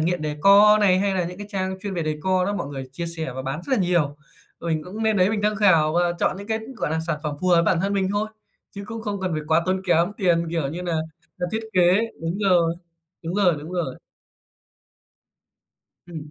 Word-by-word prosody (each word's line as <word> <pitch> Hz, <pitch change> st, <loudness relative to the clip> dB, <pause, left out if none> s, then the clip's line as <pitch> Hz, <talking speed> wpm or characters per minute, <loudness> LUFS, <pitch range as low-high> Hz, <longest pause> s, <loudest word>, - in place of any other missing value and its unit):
Nghiện 170 Hz, +1 st, 0 dB
Decor 200 Hz, +8 st, +5 dB
này, 185 Hz, -2 st, +4 dB
hay 195 Hz, 0 st, +1 dB
nà 180 Hz, -, 0 dB
những 180 Hz, +2 st, -7 dB
cái 205 Hz, -, -7 dB
trang 190 Hz, -2 st, -3 dB
chuyên 200 Hz, -1 st, -4 dB
về 170 Hz, -, -1 dB
decor 180 Hz, +5 st, 0 dB
đó, 205 Hz, -, -1 dB
mọi 200 Hz, -, -3 dB
người 135 Hz, -2 st, -7 dB
chia 170 Hz, +5 st, -4 dB
sẻ 160 Hz, -5 st, -4 dB
và 130 Hz, +1 st, -5 dB
bán 135 Hz, +4 st, -4 dB
rất 275 Hz, -, -5 dB
là -, -, 0 dB
nhiều. 170 Hz, -5 st, +1 dB, 0.4 s
Và 170 Hz, -, -5 dB
mình 160 Hz, -1 st, 0 dB
cũng 210 Hz, +5 st, -5 dB
lên 220 Hz, -1 st, +2 dB
đấy 185 Hz, +1 st, +3 dB
mình 220 Hz, -, -1 dB
tham 210 Hz, 0 st, +1 dB
khảo 165 Hz, -7 st, +4 dB
và 175 Hz, +1 st, +2 dB
chọn -, -, +1 dB
những 200 Hz, +1 st, -9 dB
cái, 220 Hz, 0 st, -1 dB, 0.2 s
gọi 150 Hz, -, -2 dB
là, 160 Hz, -, 0 dB
sản 165 Hz, -2 st, -2 dB
phẩm 150 Hz, -1 st, -3 dB
phù 185 Hz, -, 0 dB
hợp 170 Hz, -2 st, +5 dB
bản 165 Hz, 0 st, +2 dB
thân 195 Hz, +1 st, 0 dB
mình 195 Hz, -2 st, +1 dB
thôi, 210 Hz, +1 st, -1 dB, 0.5 s
chứ 200 Hz, -, -6 dB
cũng 225 Hz, +1 st, -6 dB
không 205 Hz, -2 st, -3 dB
cần 185 Hz, -2 st, -2 dB
phải 155 Hz, -1 st, -2 dB
quá 160 Hz, +1 st, +3 dB
tốn 185 Hz, 0 st, 0 dB
kém 175 Hz, +1 st, +2 dB
tiền, 170 Hz, -3 st, +2 dB
kiểu 165 Hz, -4 st, -1 dB
như 170 Hz, +5 st, -5 dB
nà 175 Hz, -1 st, -2 dB, 0.5 s
nà, 180 Hz, -, -1 dB
thiết 220 Hz, -, -1 dB
kế. 180 Hz, 0 st, +4 dB, 0.2 s
Đúng 165 Hz, +4 st, -3 dB
rồi, 175 Hz, -5 st, +3 dB, 0.5 s
đúng 165 Hz, +2 st, -4 dB
rồi, 190 Hz, -4 st, +3 dB
đúng 155 Hz, +5 st, -9 dB
rồi. 165 Hz, -8 st, -2 dB, 2.1 s
Ừm. 155 Hz, -4 st, -9 dB
180 Hz, 240 wpm, -23 LUFS, 165-200 Hz, 2.1 s, Decor